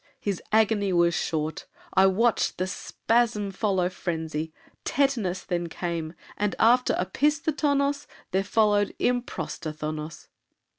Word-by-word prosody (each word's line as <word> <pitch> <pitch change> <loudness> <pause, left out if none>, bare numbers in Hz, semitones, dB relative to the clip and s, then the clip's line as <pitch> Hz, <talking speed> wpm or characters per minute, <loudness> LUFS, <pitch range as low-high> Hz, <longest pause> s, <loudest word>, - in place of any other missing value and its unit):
His 200 -4 -2
agony 215 -2 +3
was 170 -1 +3
short. 155 -1 -2 0.3
I 190 0 +6
watched 225 +5 +2
The 185 - 0
spasm 215 +2 0
follow 190 -2 +1
frenzy; 160 -3 -3 0.3
tetanos 235 -10 0
Then 175 -2 -2
came, 170 -1 -4 0.2
and 205 0 0
after 245 +3 +4
opisthotonos 285 - +1 0.2
There 190 +1 +1
followed 205 0 +2
improstathonos. 155 -9 -3
195 Hz, 105 wpm, -26 LUFS, 170-230 Hz, 0.3 s, I